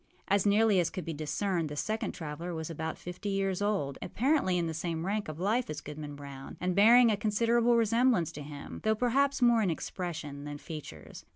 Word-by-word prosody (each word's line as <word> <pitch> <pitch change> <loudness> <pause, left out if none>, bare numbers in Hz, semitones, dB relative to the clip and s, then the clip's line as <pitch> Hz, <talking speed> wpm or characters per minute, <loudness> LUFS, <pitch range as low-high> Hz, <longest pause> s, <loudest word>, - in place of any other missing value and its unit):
As 200 +1 +2
nearly 210 -1 +4
as 170 - +2
could 185 -4 -6
be 165 - -3
discerned, 160 +3 -1
the 145 - -6
second 215 +8 -2
traveller 165 +2 -5
was 160 0 -4
about 160 0 -4
fifty 180 +4 -6
years 195 -1 0
old, 195 -10 -1
apparently 255 -8 +1
in 170 - 0
the 165 - -3
same 165 0 -3
rank 205 +2 -1
of 155 0 -7
life 220 +7 +1
as 155 -1 -4
Goodman 150 0 -7
Brown, 140 -1 -9
and 180 0 -1
bearing 230 +4 +7
a - - +2
considerable 230 +3 +2
resemblance 230 -6 +3
to 150 - -8
him, 145 -1 -8
though 220 0 +3
perhaps 270 +4 +2
more 235 -2 +5
in 200 - +1
expression 160 -4 -5
than 145 0 -6
features. 155 0 -9
180 Hz, 200 wpm, -30 LUFS, 155-220 Hz, -, bearing